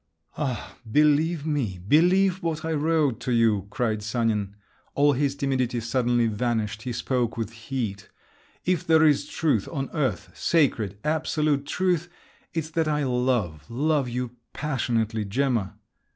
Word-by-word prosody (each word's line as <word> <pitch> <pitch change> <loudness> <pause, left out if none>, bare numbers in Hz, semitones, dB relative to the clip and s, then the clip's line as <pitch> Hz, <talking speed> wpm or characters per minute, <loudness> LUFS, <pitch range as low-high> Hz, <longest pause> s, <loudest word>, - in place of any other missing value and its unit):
"Ah, 130 -7 -4
believe 150 +3 +3
me! 130 - -1
believe 185 - +4
what 160 -2 -2
I 160 - -1
wrote 150 -5 +1
to 125 - -3
you!" 110 -5 +2
cried 115 -4 -1
Sanin; 105 -2 -1 0.4
all 145 0 +4
his 140 +1 0
timidity 130 -4 0
suddenly 120 0 +1
vanished, 110 -1 -1
he 125 - -4
spoke 120 -1 -1
with 115 -1 -3
heat; 115 -4 -5 0.6
"if 180 -3 +1
there 160 -1 +6
is 150 -2 +3
truth 145 - 0
on 135 -4 -3
earth—sacred, 135 - 0
absolute 150 -2 0
truth—it's 175 -2 -3
that 160 -1 0
I 150 -1 +1
love, 125 - 0
love 140 +2 +1
you 125 0 -3 0.2
passionately, 115 -6 -1
Gemma." 115 -1 0
130 Hz, 130 wpm, -25 LUFS, 115-155 Hz, 0.6 s, there